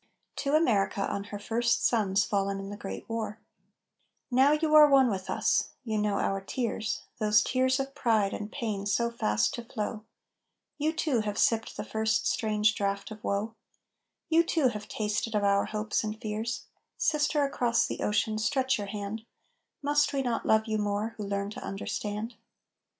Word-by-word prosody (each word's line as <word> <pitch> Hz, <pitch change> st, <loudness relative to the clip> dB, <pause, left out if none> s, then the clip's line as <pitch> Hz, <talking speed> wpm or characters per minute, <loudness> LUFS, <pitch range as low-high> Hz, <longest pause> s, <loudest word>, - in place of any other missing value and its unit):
TO 280 Hz, +1 st, 0 dB
AMERICA, 205 Hz, -10 st, +2 dB
ON 200 Hz, 0 st, -3 dB
HER 205 Hz, -, -6 dB
FIRST 235 Hz, +3 st, 0 dB
SONS 200 Hz, -4 st, +2 dB
FALLEN 195 Hz, -1 st, -1 dB
IN 195 Hz, +1 st, -6 dB
THE -, -, -5 dB
GREAT 205 Hz, -1 st, -7 dB
WAR 225 Hz, -1 st, -4 dB, 0.9 s
Now 265 Hz, +3 st, +5 dB
you 305 Hz, 0 st, +1 dB
are 300 Hz, -1 st, +9 dB
one 265 Hz, -3 st, +5 dB
with 190 Hz, -1 st, -4 dB
us, -, -, +1 dB
you 220 Hz, -3 st, -1 dB
know 210 Hz, -1 st, +1 dB
our 195 Hz, 0 st, 0 dB
tears, 220 Hz, +1 st, -3 dB, 0.2 s
Those 210 Hz, 0 st, +4 dB
tears 260 Hz, +1 st, +1 dB
of 270 Hz, 0 st, -3 dB
pride 220 Hz, -7 st, +1 dB
and 210 Hz, 0 st, -5 dB
pain 205 Hz, -4 st, -3 dB
so 235 Hz, +3 st, +1 dB
fast 105 Hz, -, +1 dB
to 235 Hz, -, -5 dB
flow; 215 Hz, -1 st, -4 dB, 0.8 s
You 305 Hz, +2 st, +1 dB
too 305 Hz, -6 st, 0 dB
have 210 Hz, -1 st, -2 dB
sipped 225 Hz, -1 st, +1 dB
the -, -, -3 dB
first 220 Hz, 0 st, 0 dB
strange 215 Hz, -2 st, +2 dB
draught 200 Hz, 0 st, -2 dB
of 215 Hz, -1 st, -9 dB
woe; 205 Hz, +3 st, -1 dB, 0.7 s
You 330 Hz, +1 st, +4 dB
too 320 Hz, -5 st, +2 dB
have 210 Hz, -2 st, -6 dB
tasted 215 Hz, +1 st, -2 dB
of 205 Hz, -, +1 dB
our 200 Hz, 0 st, +3 dB
hopes 215 Hz, +1 st, -1 dB
and 215 Hz, 0 st, -4 dB
fears; 220 Hz, +2 st, -3 dB, 0.3 s
Sister 300 Hz, -1 st, +2 dB
across 245 Hz, -4 st, +1 dB
the -, -, -5 dB
ocean, 215 Hz, +1 st, 0 dB
stretch 260 Hz, +2 st, +1 dB
your 205 Hz, -, -4 dB
hand, 205 Hz, +2 st, -5 dB, 0.6 s
Must 290 Hz, +1 st, +2 dB
we 275 Hz, -1 st, 0 dB
not 240 Hz, -3 st, -2 dB
love 220 Hz, 0 st, +4 dB
you 220 Hz, -1 st, -1 dB
more, 210 Hz, +2 st, -1 dB
who 210 Hz, -, -4 dB
learn 200 Hz, 0 st, -2 dB
to -, -, -8 dB
understand? 210 Hz, +3 st, -4 dB
220 Hz, 175 wpm, -29 LUFS, 205-245 Hz, 0.9 s, are